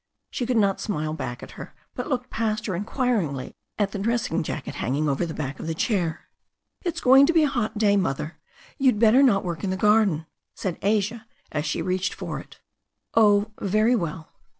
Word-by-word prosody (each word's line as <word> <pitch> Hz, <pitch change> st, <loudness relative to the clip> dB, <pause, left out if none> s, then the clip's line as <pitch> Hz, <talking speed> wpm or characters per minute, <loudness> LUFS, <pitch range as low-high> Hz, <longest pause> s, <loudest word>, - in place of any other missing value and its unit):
She 245 Hz, -, -3 dB
could 250 Hz, -2 st, +1 dB
not 200 Hz, -3 st, +2 dB
smile 155 Hz, -7 st, -2 dB
back 125 Hz, -6 st, -5 dB
at -, -, -9 dB
her, -, -, -10 dB, 0.2 s
but -, -, -4 dB
she -, -, -8 dB
looked 255 Hz, -2 st, -2 dB
past 215 Hz, -1 st, -1 dB
her 190 Hz, -, -2 dB
inquiringly 205 Hz, -, -1 dB, 0.2 s
at 200 Hz, -2 st, 0 dB
her 205 Hz, -, -3 dB
dressing 220 Hz, -5 st, 0 dB
jacket 150 Hz, -2 st, -5 dB
hang 125 Hz, +7 st, 0 dB
ing 155 Hz, +1 st, 0 dB
over 145 Hz, +4 st, 0 dB
the 160 Hz, -, -5 dB
back 145 Hz, -2 st, -4 dB
of -, -, -6 dB
the 165 Hz, -, -2 dB
chair. 175 Hz, -4 st, -1 dB, 0.5 s
"It's 345 Hz, -4 st, -3 dB
going 270 Hz, +2 st, +7 dB
to 335 Hz, -, +2 dB
be 325 Hz, -2 st, +5 dB
a -, -, +4 dB
hot 240 Hz, -5 st, -2 dB
day. 205 Hz, -1 st, +3 dB
Mother. 155 Hz, -3 st, -2 dB, 0.4 s
You'd 260 Hz, -5 st, +4 dB
better 230 Hz, +4 st, +5 dB
not 210 Hz, -9 st, +4 dB
work 170 Hz, 0 st, -4 dB
in 195 Hz, -, -1 dB
the 190 Hz, -, -1 dB
garden," 210 Hz, -6 st, +3 dB, 0.3 s
said 185 Hz, -4 st, -4 dB
Asia, 215 Hz, +2 st, 0 dB, 0.2 s
as 150 Hz, 0 st, -2 dB
she 165 Hz, -, -1 dB
reached 185 Hz, +1 st, -1 dB
for -, -, -5 dB
it. -, -, -14 dB, 0.6 s
'*0h, 210 Hz, -1 st, +4 dB
very 215 Hz, +5 st, +2 dB
well." 165 Hz, -5 st, -4 dB
200 Hz, 205 wpm, -25 LUFS, 165-230 Hz, 0.6 s, going